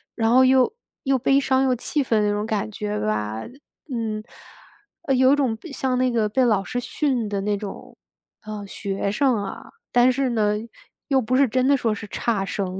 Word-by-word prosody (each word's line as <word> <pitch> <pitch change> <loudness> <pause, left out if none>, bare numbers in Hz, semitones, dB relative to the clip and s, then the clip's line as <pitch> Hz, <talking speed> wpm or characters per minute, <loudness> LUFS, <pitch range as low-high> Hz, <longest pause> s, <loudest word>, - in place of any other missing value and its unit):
然 225 -1 +1
后 260 +2 +6
又 260 -1 +4 0.3
又 270 0 +2
悲 270 +2 +3
伤 265 -1 +2
又 260 -1 +2
气 285 +4 -1
愤 225 -4 +1
那 205 - +2
种 205 +1 -1
感 210 - -2
觉 105 0 -3
吧。 105 +1 -2 0.5
嗯， 220 -3 -3 0.8
呃， 280 -5 0
有 260 +1 +5
一 - - +5
种 260 -6 0 0.2
像 260 -2 -1
那 255 0 +2
个 225 -3 +1
被 255 +5 +2
老 210 -5 +2
师 245 - -3
训 250 -2 -1
的 200 -1 -2
那 205 +1 0
种， 200 -1 -9 0.5
呃， 210 -1 -6
学 195 0 -3
生 260 +3 +2
啊。 195 - -8 0.2
但 245 +1 +5
是 265 +1 0
呢， 210 -2 +1 0.5
又 270 -2 +4
不 245 +2 -1
是 275 - +5
真 255 +3 +1
的 280 - +5
说 230 -4 0
是 210 0 -7
差 205 -1 -1
生， 190 -1 -3
230 Hz, 210 characters per minute, -23 LUFS, 205-260 Hz, 0.8 s, 后